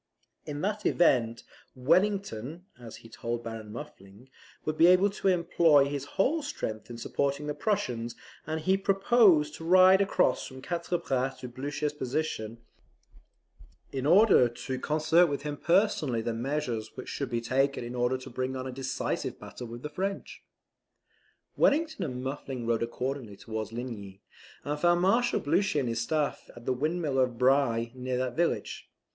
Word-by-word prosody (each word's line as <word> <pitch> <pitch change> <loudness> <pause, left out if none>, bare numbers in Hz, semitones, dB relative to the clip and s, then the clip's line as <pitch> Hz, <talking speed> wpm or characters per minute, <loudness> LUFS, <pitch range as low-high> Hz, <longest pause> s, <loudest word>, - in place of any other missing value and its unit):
In 145 0 -4
that 210 +2 -2
event 115 -9 +2 0.3
Wellington, 170 - 0
as 115 -2 -10
he - - -9
told 120 +1 -4
Baron 115 -2 -7
Muffling, 110 -2 -11 0.4
would 155 - -1
be 165 - +6
able 185 +3 +5
to 200 - -3
employ 170 -5 +4
his 140 -1 -4
whole 310 +11 +2
strength 110 - -5
in 120 - -7
supporting 140 +4 -2
the 150 - -2
Prussians: 120 - -2 0.3
and 160 0 -2
he 190 +4 +2
proposed 195 -5 +4
to 165 - -9
ride 185 +3 +6
across 200 - +1
from 130 -1 -10
Quatre 170 +4 -2
Bras 130 -3 -2
to 125 - -5
Blucher's 145 +4 -3
position, 130 -5 -3 1.3
in 135 0 -2
order 180 - +6
to 130 +2 -5
concert 155 +4 +3
with 140 -2 -3
him 150 -1 -3
personally 165 - +1
the 115 - -2
measures 120 -3 -3
which - - -7
should 140 -3 -4
be 120 -1 -1
taken 135 +3 0
in 120 +1 -6
order 125 +1 0
to 130 - -10
bring 130 +2 -3
on 130 0 -4
a 130 - -4
decisive 130 +1 -3
battle 125 - -9
with 120 +1 -9
the - - -2
French. 195 +6 -4 1.1
Wellington 315 0 +2
and 125 -1 -5
Muffling 135 -2 -5
rode 115 -1 +1
accordingly 120 -1 -4
towards 110 -1 -5
Ligny, 110 -5 -7 0.4
and 150 +1 -3
found 175 +1 +3
Marshal 235 +6 +3
Blucher 170 +2 +1
and 130 -4 -1
his 115 0 -1
staff 150 +4 -2
at 120 0 -12
the 130 - +1
windmill 150 +1 -1
of 125 -2 +1
Bry, 125 -3 +2
near 130 0 -3
that 125 -1 -2
village. 170 0 -1
140 Hz, 165 wpm, -29 LUFS, 120-170 Hz, 1.3 s, be